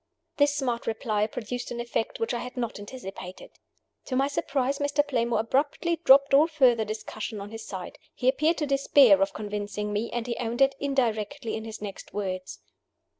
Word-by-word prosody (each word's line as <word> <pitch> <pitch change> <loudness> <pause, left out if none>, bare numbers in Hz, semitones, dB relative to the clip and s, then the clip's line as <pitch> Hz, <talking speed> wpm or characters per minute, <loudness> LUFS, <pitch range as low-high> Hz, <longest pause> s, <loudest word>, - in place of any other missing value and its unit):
This 285 -1 +3
smart 245 -5 -2
reply 215 -2 0
produced 245 +2 -5
an 240 - -5
effect 235 -1 -2
which 225 - -1
I 240 - -1
had 250 +1 -7
not 235 -4 -3
anticipated. 195 -4 -9 0.5
To 255 - -3
my 270 +2 +3
surprise, 275 -1 -1
Mr. 290 0 +1
Playmore 235 -4 +1
abruptly 285 +8 0
dropped 275 -1 +6
all 295 +3 +7
further 260 -8 +4
discussion 215 0 -5
on 200 +1 -8
his 225 0 -8
side. 185 -2 -7 0.2
He 250 - -2
appeared 305 +5 +3
to 300 - 0
despair 275 -7 +5
of 195 - +1
convincing 210 0 -4
me, 215 +3 -1
and 240 -1 -2
he 240 -1 -2
owned 240 0 -3
it 270 0 +3
indirectly 255 -2 -1
in 220 - -5
his 220 -1 -7
next 200 -1 -8
words. 185 -2 -4
235 Hz, 180 wpm, -27 LUFS, 215-275 Hz, 0.5 s, all